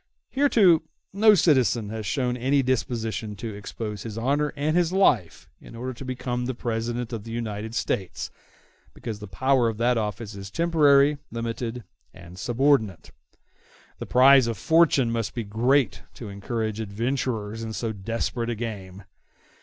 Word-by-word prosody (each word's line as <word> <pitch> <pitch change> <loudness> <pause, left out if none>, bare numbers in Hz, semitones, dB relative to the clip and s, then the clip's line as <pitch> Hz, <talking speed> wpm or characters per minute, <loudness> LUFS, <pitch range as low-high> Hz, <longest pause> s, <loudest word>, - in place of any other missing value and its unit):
Hitherto 220 - +4 0.3
no 210 +2 +6
citizen 125 - +2
has 110 -1 -5
shown 125 -3 0
any 135 +3 +1
disposition 115 -4 -2
to 110 +2 -6
expose 105 0 -6
his 110 -1 -7
honor 145 +5 0
and 150 +3 0
his 175 -1 +2
life 140 - +2
in - - -12
order 130 +2 -5
to 125 - -10
become 125 -1 -3
the 130 - -3
President 120 +1 -3
of 110 -3 -4
the 115 - -10
United 110 -1 -4
States; 95 -5 -2 0.6
because 110 -3 -6
the 105 - -8
power 130 +5 +2
of 110 - -5
that 120 +1 +2
office 105 0 -4
is 100 -1 -8
temporary, 145 -1 +4
limited, 115 +1 -4 0.3
and 90 0 -12
subordinate. 115 - +1 0.9
The - - -6
prize 130 0 +6
of 115 -2 -2
fortune 160 - +3
must 115 -3 -2
be 120 - -2
great 115 +3 +1
to 115 - -8
encourage 110 +2 -3
adventurers 115 0 -2
in 110 -1 -5
so 115 +1 -3
desperate 115 +3 -3
a 120 - -1
game. 100 -4 -6
115 Hz, 155 wpm, -25 LUFS, 110-135 Hz, 0.9 s, no